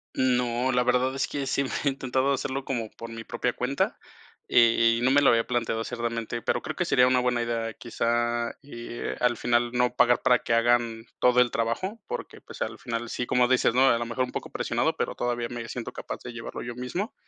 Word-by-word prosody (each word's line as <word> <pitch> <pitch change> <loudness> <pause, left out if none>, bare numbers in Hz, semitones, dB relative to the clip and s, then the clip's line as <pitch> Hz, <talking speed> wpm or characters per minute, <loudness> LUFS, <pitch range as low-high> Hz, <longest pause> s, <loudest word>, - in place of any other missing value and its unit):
No, 125 0 +1
la 125 -1 +2
verdad 125 +1 +2
es 135 - 0
que 140 -1 -3
sí, 135 +1 0
mm, 135 - -3 0.2
he - - +5
intentado 135 0 0
hacerlo 135 0 -3
como 115 -5 -2
por 115 - -9
mi 115 0 -7
propia 120 +1 -2
cuenta, 135 +3 -1 0.5
e - - 0
eh, 115 0 +5
y - - -4
no 130 +2 +3
me 145 - +5
lo 140 - +6
había 115 0 +3
planteado 115 -2 -1
así, 125 - -6
realmente, 115 0 -3
pero - - 0
creo - - -5
que - - -1
sería 125 - +4
una 130 0 +3
buena 125 -1 +1
idea, 115 -1 -2
quizá, 120 0 -1
eh, 120 -3 -6
al 120 -1 +2
final 120 0 +1
no 125 0 +2
pagar 120 0 +4
para 125 -1 +4
que 115 - -2
hagan 115 -1 +2
todo 125 0 +5
el 120 - +2
trabajo, 185 - -2
porque, 485 +2 -6
pues, - - -12
al - - -3
final, 115 -1 -4
sí, 125 - -3
como 125 -1 +3
dices, 130 -2 +3
¿no?, 135 +2 +5
a 120 - +4
lo 120 - -2
mejor 120 +2 -1
un 125 - -4
poco - - -5
presionado, - - -1
pero - - -2
todavía 120 -1 -2
me 120 -1 -6
siento 125 0 -5
capaz - - -7
de 120 - -6
llevarlo 115 -1 -7
yo 120 0 -6
mismo. 175 - -4
120 Hz, 235 wpm, -26 LUFS, 115-130 Hz, 0.5 s, lo